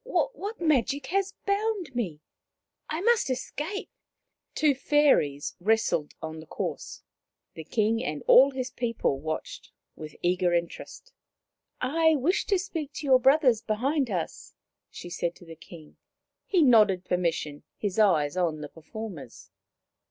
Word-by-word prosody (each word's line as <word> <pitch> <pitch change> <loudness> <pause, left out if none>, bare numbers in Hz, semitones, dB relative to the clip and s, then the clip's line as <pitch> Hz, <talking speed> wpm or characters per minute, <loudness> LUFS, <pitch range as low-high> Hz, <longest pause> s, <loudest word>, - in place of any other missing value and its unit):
" - - -51
What 465 -3 -2
magic 290 -3 +1
has 390 0 0
bound 400 -6 -1
me? 180 -11 -3 0.7
I 315 +3 -2
must 465 - +2
escape." 295 +9 -4 0.6
Two 300 -2 +3
fairies 265 - +2
wrestled 200 -6 +1
on 160 0 -6
the 160 - -12
course. - - -5 0.5
The 160 - -8
King 220 +6 0
and 150 0 -4
all 270 +2 +7
his 260 -1 -4
people 230 - -1
watched 155 +2 -6 0.2
with 155 -1 -9
eager 175 0 +2
interest. 170 - -5 0.4
" - - -49 0.2
I 320 -1 +6
wish 305 +8 0
to 400 - +3
speak 325 -6 -5
to 295 - -6
your 260 -2 +5
brothers 265 -3 +4
behind 260 +6 0
us, 180 -5 -5
M - - -61 0.3
she 175 - -10
said 170 0 -2
to 175 - -16
the 165 -1 -10
King. 160 -1 -14 0.5
He 360 -5 +3
nodded 210 -8 +5
permission, 165 -5 -1 0.2
his 205 0 -2
eyes 165 -8 +3
on 165 -4 -1
the 150 - -7
performers. 165 - -9
225 Hz, 145 wpm, -27 LUFS, -, 0.7 s, all